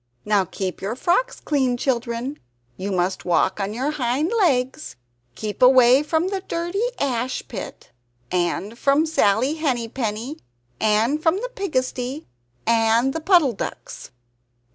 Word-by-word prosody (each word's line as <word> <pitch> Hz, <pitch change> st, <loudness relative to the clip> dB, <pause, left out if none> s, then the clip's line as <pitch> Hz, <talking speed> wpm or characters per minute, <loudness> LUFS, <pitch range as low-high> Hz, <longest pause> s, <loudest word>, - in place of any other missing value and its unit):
"Now 205 Hz, -2 st, +2 dB
keep 185 Hz, +1 st, -5 dB
your 210 Hz, +4 st, -3 dB
frocks 370 Hz, -, 0 dB
clean, 260 Hz, -5 st, 0 dB
children! 245 Hz, +2 st, -2 dB, 0.4 s
You 195 Hz, +7 st, -4 dB
must 185 Hz, 0 st, -1 dB
walk 180 Hz, +3 st, +1 dB
on 195 Hz, 0 st, -2 dB
your 260 Hz, +7 st, -1 dB
hind 290 Hz, -, -1 dB
legs. 285 Hz, -, +1 dB, 0.4 s
Keep 210 Hz, -2 st, -5 dB
away 255 Hz, +1 st, +7 dB
from 320 Hz, +4 st, 0 dB
the 390 Hz, -1 st, -3 dB
dirty 345 Hz, +2 st, -3 dB, 0.2 s
ash 255 Hz, -2 st, -1 dB
pit, 190 Hz, -, -8 dB, 0.4 s
and 180 Hz, +5 st, -1 dB
from 280 Hz, +3 st, +3 dB
Sally 260 Hz, -3 st, +2 dB
Henny 265 Hz, -8 st, -1 dB
Penny, 230 Hz, +4 st, -4 dB, 0.4 s
and 220 Hz, +8 st, +2 dB
from 320 Hz, +2 st, +3 dB
the -, -, -4 dB
pigsty 260 Hz, -, -2 dB, 0.4 s
and 230 Hz, +3 st, +3 dB
the 325 Hz, -, -4 dB
Puddle 325 Hz, -7 st, +4 dB
ducks." 195 Hz, -, -7 dB
255 Hz, 135 wpm, -22 LUFS, 220-305 Hz, 0.4 s, away